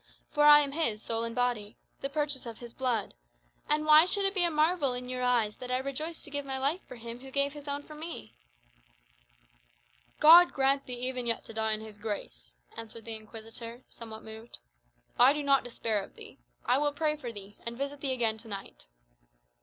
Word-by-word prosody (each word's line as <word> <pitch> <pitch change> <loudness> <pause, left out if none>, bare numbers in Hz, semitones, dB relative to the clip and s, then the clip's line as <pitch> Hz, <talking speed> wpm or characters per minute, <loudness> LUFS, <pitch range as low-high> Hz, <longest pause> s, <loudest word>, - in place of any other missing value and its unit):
For 295 0 +3
I 295 0 +10
am 280 -1 -2
his, 275 -9 0
soul 225 +1 -3
and 230 0 -4
body 240 -4 -1 0.2
the 275 - -3
purchase 285 -3 -1
of 230 -2 -7
his 235 -1 -10
blood. 245 -6 -1 0.6
And 300 +1 +2
why 310 +2 +8
should 400 +1 +2
it 390 - +1
be 375 -3 +3
a 345 - +3
marvel 305 -3 +2
in 250 0 -6
your 255 0 -3
eyes 240 -4 +2
that 250 - -8
I 255 - +1
rejoice 275 +5 -4
to 295 - -9
give 285 0 -2
my 270 -1 -3
life 285 +8 0
for - - -9
him 235 0 -8
who 265 +1 -10
gave 280 +1 0
his 295 -1 -10
own 285 0 -3
for 305 - -12
me?" 315 - -7 1.9
"God 340 +3 +9
grant 275 0 +2
thee 250 - -4
even 250 -2 -2
yet 230 - -1
to - - -10
die 220 0 0
in 215 - -3
his 215 -1 -10
grace!" - - -6 0.2
answered 230 0 -8
the 230 - -4
Inquisitor, 225 +2 -9
somewhat 220 -1 -10
moved. 220 +1 -10 0.6
"I 255 +3 +8
do 295 0 -3
not 275 -1 +4
despair 225 -3 -2
of - - -14
thee. - - -12 0.3
I 260 - +3
will 290 0 +1
pray 300 +1 +1
for 255 -6 -6
thee, 205 -1 -11
and 235 0 -5
visit 280 +1 -4
thee 275 - +1
again 230 -4 0
to 225 - -13
night." 195 - -8
255 Hz, 210 wpm, -30 LUFS, 225-290 Hz, 1.9 s, I